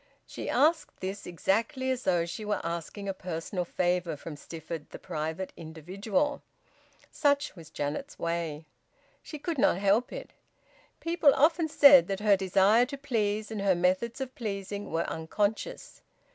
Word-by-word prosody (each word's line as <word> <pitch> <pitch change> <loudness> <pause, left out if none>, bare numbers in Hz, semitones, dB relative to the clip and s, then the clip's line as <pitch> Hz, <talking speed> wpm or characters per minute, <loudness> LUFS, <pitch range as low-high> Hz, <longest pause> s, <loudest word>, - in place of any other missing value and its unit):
She - - -6
asked 315 +2 +2
this 195 +2 -5
exactly 230 - 0
as 255 -1 -3
though 175 -2 +2
she 170 +5 -6
were 210 0 -1
asking 170 +4 -4
a 195 - -1
personal 180 0 -4
favour 175 -2 0
from 150 +2 -8
Stifford 160 +1 -8
the - - -8
private 160 +2 -4
individual. 190 - -2 0.7
Such 285 -6 +1
was 165 -4 -12
Janet's 155 - -4
way. 165 -2 -3 0.6
She 305 - -8
could 310 0 -3
not 180 - +4
help 205 +5 +2
it. - - -7 0.7
People 330 -4 +4
often 320 +3 +3
said 280 -3 +8
that 195 -1 -2
her 210 -1 +5
desire 195 +5 +4
to 280 +1 -6
please, 220 -6 -1
and 215 -2 -3
her 195 -2 +3
methods 185 +8 +1
of 265 -1 -4
pleasing, 200 -2 -5
were 165 +1 0
unconscious. 210 - -3
200 Hz, 150 wpm, -29 LUFS, 170-260 Hz, 0.7 s, said